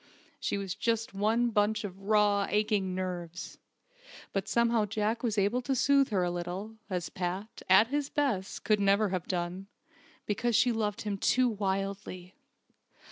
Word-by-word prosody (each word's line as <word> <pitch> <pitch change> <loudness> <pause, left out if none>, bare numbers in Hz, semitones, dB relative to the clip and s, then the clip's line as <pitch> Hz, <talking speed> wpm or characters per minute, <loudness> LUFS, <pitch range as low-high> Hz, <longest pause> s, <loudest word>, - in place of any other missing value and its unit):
She - - -1
was 195 -2 -3
just 225 +1 -1
one 225 +4 +1
bunch 210 +1 +1
of 195 -2 -7
raw, 205 -1 +3
aching 205 -3 +1
nerves! 180 -2 -5 0.7
But 195 -2 -1
somehow 235 -2 +2
Jack 220 +2 -1
was 225 -4 -1
able 205 +5 +2
to 265 +2 -1
soothe 275 +1 +4
her 195 -5 +1
a 175 - 0
little, 180 +5 -5
as 180 -3 -2
Pat, 185 +4 -4
at 200 +5 +6
his 290 0 -1
best, 240 -10 -1
could 215 -1 +2
never 200 +1 +3
have 185 -2 -3
done, 180 +1 -3 0.6
because 230 +3 0
she 245 +3 +4
loved 210 -3 -2
him 205 -2 -3
too 255 +5 +3
wildly. 195 -3 -3
205 Hz, 155 wpm, -30 LUFS, 190-225 Hz, 0.7 s, at